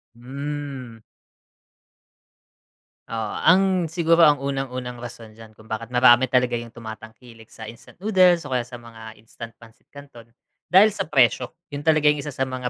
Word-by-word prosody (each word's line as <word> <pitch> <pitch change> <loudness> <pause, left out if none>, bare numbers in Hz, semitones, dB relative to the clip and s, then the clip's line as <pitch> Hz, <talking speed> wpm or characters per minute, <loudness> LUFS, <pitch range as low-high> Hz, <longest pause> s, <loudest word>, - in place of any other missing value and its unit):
Hmm. 135 -2 -7 2.1
Oo, 110 -2 -4
ang 185 -1 +3
siguro 165 0 +2
ang 150 -3 +6
unang-unang 130 -3 -5
rason 115 -2 -10
diyan 110 0 -16
kung 110 - -17
bakit 110 +1 -6
marami 125 0 +4
talaga 125 -1 +1
'yung 120 0 -4
tumatangkilik 110 0 -12
sa - - -11
instant 115 +2 -14
noodles 185 -4 +3
o 140 - -5
kaya 125 - +1
sa 120 +1 -10
mga 115 -2 -13
instant 115 +1 -11
pansit 115 -1 -20
canton, 140 -5 -14 0.4
dahil 195 +3 +5
sa 160 - -5
presyo. 130 0 +1 0.2
'Yun 145 - -5
talaga 155 -1 +2
ang 150 - -5
isa 150 - -6
sa 135 -1 -2
mga 130 -1 -5
125 Hz, 155 wpm, -22 LUFS, 115-145 Hz, 2.1 s, ang